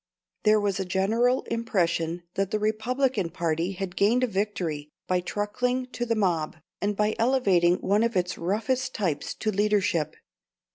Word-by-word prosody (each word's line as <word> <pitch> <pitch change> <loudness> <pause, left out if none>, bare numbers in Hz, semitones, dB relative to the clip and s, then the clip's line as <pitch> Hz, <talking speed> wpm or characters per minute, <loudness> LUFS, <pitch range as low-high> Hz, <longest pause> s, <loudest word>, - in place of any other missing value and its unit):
There 215 0 +6
was 200 -2 0
a - - 0
general 220 +7 +1
impression 175 -7 -1
that 195 -1 0
the 215 - 0
Republican 220 -1 0
party 170 +1 -1
had 190 -1 -5
gained 230 +6 +3
a - - +6
victory 185 -8 -2 0.2
by 180 0 +1
truckling 245 +7 -1
to 240 -1 -3
the 230 - +1
mob, 175 -8 0 0.3
and 205 0 0
by 210 +1 +1
elevating 200 -9 +3
one 205 +2 +2
of 230 0 +1
its 180 0 0
roughest 230 +8 -1
types 175 -9 -2
to 215 - -1
leadership. 200 -6 +1
205 Hz, 155 wpm, -26 LUFS, 180-225 Hz, 0.3 s, There